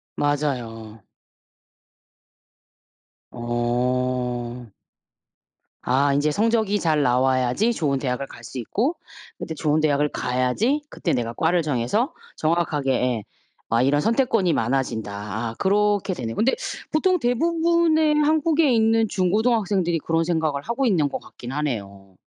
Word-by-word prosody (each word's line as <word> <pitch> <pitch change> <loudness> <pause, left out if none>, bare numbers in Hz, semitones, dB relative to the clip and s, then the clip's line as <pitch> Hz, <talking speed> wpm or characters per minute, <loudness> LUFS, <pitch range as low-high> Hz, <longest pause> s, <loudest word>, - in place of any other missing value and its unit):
맞아요. 120 -7 -2 2.3
어. 120 0 -2 1.1
아 140 +2 +2
인제 145 +2 +1
성적이 215 +1 +1
잘 155 -4 +1
나와야지 130 - +2
좋은 140 -8 0
대학을 130 0 -2
갈 120 - -13
수 125 - -8
있고 245 - -1 0.4
인제 160 - -5
좋은 150 0 +1
대학을 150 -1 +2
가야지 130 - 0
그때 170 - -2
내가 115 -2 -2
과를 170 +7 +1
정해서 155 - 0 0.2
정확하게 155 -4 0
예. 125 -4 0 0.5
아 115 +1 +2
이런 145 +3 +2
'선택권이 225 - +2
많아진다.' 115 -3 -1
아아 105 +3 -4
그렇게 205 0 +1
되네요. 115 -8 -5
근데 245 +4 +2 0.4
보통 365 +4 +2
대부분의 320 +4 +2
한국에 305 -1 +3
있는 225 -1 +3
중고등학생들이 195 -2 +1
그런 165 +2 0
생각을 160 -4 -1
하고 235 - -2
있는 165 - +2
것 - - -4
같긴 120 +1 -10
하네요. 100 -10 -4
150 Hz, 275 characters per minute, -23 LUFS, -, 2.3 s, 한국에